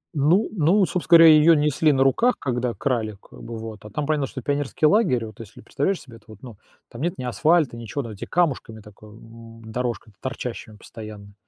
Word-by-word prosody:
Ну, 160 +9 +3
ну, 190 +2 +3
собственно 175 -1 +4
говоря, 165 -1 +8
её 155 +2 +6
несли 150 +1 +2
на 135 -2 +3
руках, 225 - +2
когда 125 -2 -2
крали, 110 -6 -2
как - - -16
бы 115 -1 -7
вот, 110 -2 -9
а 105 - -10
там 145 +8 -3
понятно, 150 -2 0
что 130 - -8
это - - -30
пионерский 145 +3 -1
лагерь, 150 - +3
вот 110 -2 -12
если 115 -4 -12
представляешь 185 +7 -2
себе, 120 -4 -14
это 110 - -25
вот, 110 -2 -15
ну, 120 -5 -11 0.3
там 120 - -10
нет 170 +3 -2
ни - - -6
асфальта, 155 +2 +1
ничего, 115 +5 -5
там 115 - -8
эти 105 - -8
камушками 140 -10 -1
такое, 105 0 -16
м, 115 +1 -14
дорожка, 120 -1 -4
торчащими 125 -4 -6
постоянно. 105 -2 -11
130 Hz, 210 wpm, -23 LUFS, 115-155 Hz, 0.3 s, говоря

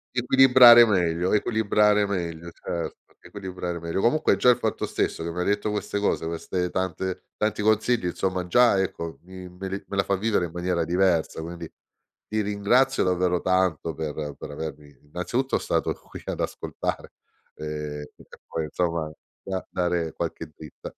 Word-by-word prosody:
Equilibrare 125 -1 +8
meglio 90 -3 +1
equilibrare 105 -1 +3
meglio, 85 -3 -4
certo, 85 -1 -6
equilibrare 90 -3 -6
meglio. 85 +3 -2
Comunque 135 +7 +3
già 125 - +4
il 125 - +5
fatto - - -2
stesso 80 - -2
che 85 - -3
m'hai 90 +1 -2
detto 105 +1 0
queste 105 0 -2
cose, 100 - 0
queste 90 +2 -2
tante 95 0 -3
tanti 105 0 -1
consigli, 110 -1 +2
insomma 90 0 -2
già 120 +2 +4
ecco 85 -3 -4
mi 95 0 -10
me 95 +2 -7
le 95 +1 -5
me 100 - -5
la 100 - +2
fa 95 0 0
vivere 105 -3 +1
in 80 - -14
maniera 90 -1 -1
diversa, 85 -2 +1
quindi 85 0 -7 0.6
ti 110 0 -1
ringrazio 105 +6 +2
davvero 90 -1 +1
tanto 95 -4 +1
per 75 -1 -5
per - - -8
avermi 75 -1 -8
innanzitutto 90 - -2
stato - - -1
stato - - -22
qui - - -9
ad - - -3
ascoltare - - -4 0.4
ehm, 75 -1 -5
e - - -16
poi 80 -1 -3
insomma 85 0 -1 0.3
da 95 -1 -4
dare 85 -2 -1
qualche 80 -2 -5
dritta. 75 +1 -11
90 Hz, 160 wpm, -25 LUFS, 85-105 Hz, 0.6 s, Equilibrare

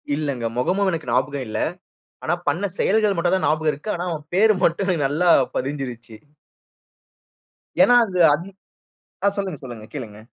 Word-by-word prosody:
இல்லங்க. 140 -6 -3
மொகமும் 190 +10 +1
எனக்கு 160 -7 -4
ஞாபகம் 130 +2 0
இல்ல. 110 - -3 0.6
ஆனா, 160 - 0
பண்ண 160 +8 +1
செயல்கள் 210 0 +2
மட்டும் 175 +2 +2
தான் 185 - 0
ஞாபகம் 155 0 +1
இருக்கு. 150 +9 -8
ஆனா 175 +1 -4
அவன் 155 -3 -5
பேர் 215 +2 +5
மட்டும் 175 +3 +2
எனக்கு 165 -7 +1
நல்லா 160 +5 +1 0.3
பதிஞ்சுருச்சு. 125 -5 -4 1.6
ஏன்னா, 245 - +6
அது 185 -3 -4 1.1
ஆ - - +6
சொல்லுங்க, 190 -6 -3
சொல்லுங்க. 120 -4 -8
கேளுங்க. 110 -7 -7
155 Hz, 145 wpm, -22 LUFS, 130-185 Hz, 1.6 s, ஏன்னா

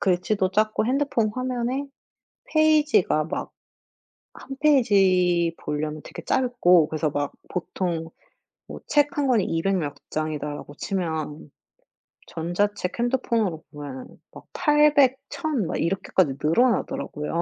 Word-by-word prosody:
글씨도 185 +1 +1
작고 215 +1 +1
핸드폰 255 -4 +1
화면에 255 +2 -2 0.7
페이지가 305 - +3
막 165 - -5 0.9
1 - - -15
페이지 185 - +3
보려면 150 0 -4
되게 - - -8
짧고 180 -11 +3
그래서 155 0 -1
막 145 -1 -2 0.2
보통 170 -2 -3 0.6
뭐 - - -8
책 295 +2 +2
1 285 -1 +1
권이 235 -7 +3
200 190 +4 0
몇 145 -3 -3 0.2
장이다 155 -1 -3
라고 145 - -10
치면 160 -6 -4 0.8
전자책 180 +4 -2
핸드폰으로 235 -9 0
보면은 145 -3 -8 0.3
막 - - -12
800 295 -3 +4
1,000 285 - -2
막 - - -2
이렇게까지 175 -3 +1
늘어나더라고요. 170 -4 0
190 Hz, 240 characters per minute, -24 LUFS, 160-255 Hz, 0.9 s, 800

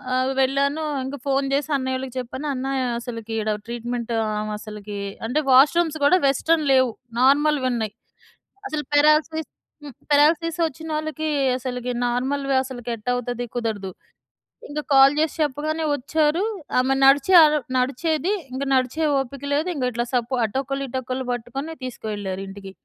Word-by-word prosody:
ఆహ్, 255 +1 +1
వెళ్ళాను. 280 +3 +1 0.2
ఇంక 275 +2 -5
ఫోన్ 275 0 +1
చేసి 285 +2 0
అన్నయ్యోళ్ళకి 260 -1 -3
చెప్పాను. 260 +4 -5
అన్నా 265 +1 -3 0.3
అసలికి 230 -2 -7
ఈడ 215 0 0
ట్రీట్మెంట్ 235 0 -4 0.2
ఆవ 215 0 -3
అసలకి 210 -1 -7 0.3
అంటే 280 +6 +1
వాష్‌రూమ్స్ 315 +4 +5
గూడా 365 +5 +5
వెస్ట్‌రన్ 310 +3 +2
లేవు. 260 -2 +4 0.3
నార్మల్‌‌వున్నాయి. 260 -6 +2 0.7
అసలు 305 -5 -3
పారాలిసిస్ 305 +2 +3 0.3
హ్మ్. 285 -3 -9 0.2
పారాలిసిస్ 320 +3 +3
వచ్చినోళ్ళకి 310 0 -4 0.3
అసలికి 250 -1 -4 0.2
నార్మల్‌వి 270 +3 -1
అసలకి 245 -2 -7
ఎట్టా 215 +4 -3
అవుతది? 245 0 -3
కుదరదు. 210 -5 -3 0.8
ఇంగ 295 +1 -4
కాల్ 270 +1 +7
చేసి 315 0 0
చెప్పగానే 305 +2 -1
వచ్చారు. 300 +5 +1 0.4
ఆమె 265 +1 +2
నడిచే 275 +7 +5
అర్ 305 0 +5 0.2
నడిచేది 310 +7 0 0.2
ఇంక. 270 +2 -3
నడిచే 260 +5 +1
ఓపిక 270 +1 -4
లేదు 305 +4 +1
ఇంక 275 -5 -3
ఇట్లా 240 +1 -2
సపో 245 +1 0
అటొకళ్ళు 275 +4 -3
ఇటొకళ్ళు 260 0 -3
పట్టుకొని 245 +7 -4
తీసుకెళ్లారింటికి. 195 -4 -6
265 Hz, 130 wpm, -23 LUFS, 245-300 Hz, 0.8 s, కాల్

